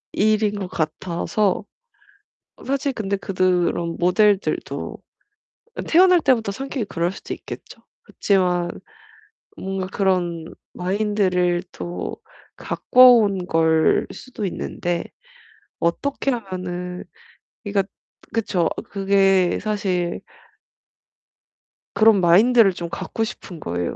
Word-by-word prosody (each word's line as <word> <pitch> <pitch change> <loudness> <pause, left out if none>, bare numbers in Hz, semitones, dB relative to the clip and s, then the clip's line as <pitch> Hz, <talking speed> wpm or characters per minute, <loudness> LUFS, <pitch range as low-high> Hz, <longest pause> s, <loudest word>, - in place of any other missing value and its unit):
이 215 +1 +3
일인 210 -1 0
것 190 - -4
같아서 175 +6 -1 0.9
어 - - -15
사실 275 +1 -1
근데 200 -5 -2
그드 195 -2 -4 0.3
런 170 -1 -3
모델들도 200 +3 +1 0.9
태어날 360 +1 +6
때부터 245 -8 +2
성격이 265 0 -4
그럴 170 -1 -1
수도 - - -7
있겠죠. - - -10 0.2
그치만 180 -3 0 0.9
뭔가 190 -1 -4
그런 180 -4 0 0.3
마인드를 185 -2 0
또 175 0 -5 0.4
가꿔온 225 -7 +4
걸 160 -2 +3
수도 235 -5 -6
있는데 175 -1 -3 0.8
어떻게 275 +11 -1
하면은 180 -5 -5 0.6
그러니까 200 -1 0 0.5
그쵸. 190 -7 0 0.2
그게 195 -2 +3
사실 190 -5 -1 1.8
그런 215 -3 +5
마인드를 200 +4 +5
좀 170 -1 -6
갖고 225 +6 -3
싶은 185 -5 -7
거에요. 85 - -3
195 Hz, 215 characters per minute, -22 LUFS, 175-215 Hz, 1.8 s, 태어날